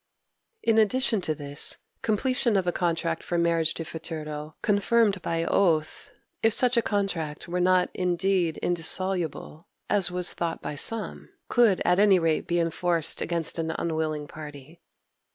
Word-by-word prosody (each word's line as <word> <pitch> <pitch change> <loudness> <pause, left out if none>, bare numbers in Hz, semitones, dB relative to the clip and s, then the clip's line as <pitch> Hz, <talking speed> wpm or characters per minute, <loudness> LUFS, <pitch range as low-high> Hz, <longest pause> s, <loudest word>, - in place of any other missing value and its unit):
In 225 -1 +3
addition 220 0 +3
to 155 -3 -2
this, 145 0 -4 0.2
completion 235 0 +2
of 190 - 0
a 175 - +1
contract 165 -2 -1
for 175 - -3
marriage 165 -1 +2
de 165 - -5
futuro 155 -2 -6
confirmed 205 -1 +2
by 165 0 -1
oath, 165 -5 0 0.3
if 225 -1 +3
such 250 +1 +2
a 235 - +4
contract 180 -9 -2
were 180 +1 -2
not 180 0 +3
indeed 180 -1 0
indissoluble, 175 -1 -1 0.2
as 200 -4 +4
was 180 0 -1
thought 170 -1 -3
by - - -5
some, 215 +9 -1 0.2
could 230 -6 +3
at 180 +2 +3
any 200 -2 +6
rate 165 -2 0
be 175 0 +1
enforced 170 -1 0
against 165 -1 -2
an 160 0 -2
unwilling 155 -2 -2
party. 150 +2 -11
175 Hz, 150 wpm, -26 LUFS, 160-195 Hz, 0.3 s, any